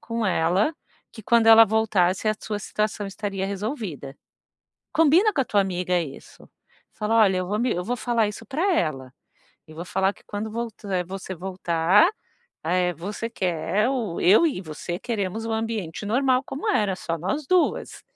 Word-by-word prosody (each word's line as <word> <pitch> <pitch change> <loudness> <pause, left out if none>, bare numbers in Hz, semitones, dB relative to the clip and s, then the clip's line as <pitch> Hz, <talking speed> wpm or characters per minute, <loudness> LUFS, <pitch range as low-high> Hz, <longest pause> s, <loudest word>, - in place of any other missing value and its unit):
com 230 -1 -3
ela, 185 - +1 0.4
que 220 - -11
quando 235 0 +3
ela 225 0 +10
voltasse, 200 -3 +1
a 215 - +2
sua 210 -1 -4
situação 210 0 -2
estaria 195 -1 -4
resolvida." 200 - -5 0.8
Combina 330 +7 +4
com 285 - 0
a - - +1
tua 205 -2 +2
amiga 180 -1 0
isso. 150 -5 -10 0.4
Fala: 215 +2 -1
"Olha 195 -4 +4
eu 185 - -2
vou 210 +1 -1
me 240 0 +1
eu 180 - -2
vou 245 +6 -2
falar 230 -3 +1
isso 210 - -8
pra 340 +8 0
ela, 135 - -1 0.5
eu 155 - -14
vou 170 +2 -6
falar 190 +2 +1
que - - -23
quando 210 +1 -5
volta 210 -5 -3
você 190 0 -6
voltar, 180 - +2 0.6
eh, 180 +2 +1
você 205 +7 -5
quer, 190 +1 0
ou 225 -10 -2
eu 210 - +6
e 270 - -2
você 175 +2 -6
queremos 220 -1 -3
o 225 - -3
ambiente 220 -5 -3
normal 255 +3 +2
como 275 - -6
era, 200 -3 +2
só 165 -2 -4
nós 270 - -3
duas." 365 -1 0
205 Hz, 170 wpm, -24 LUFS, 180-230 Hz, 0.8 s, ela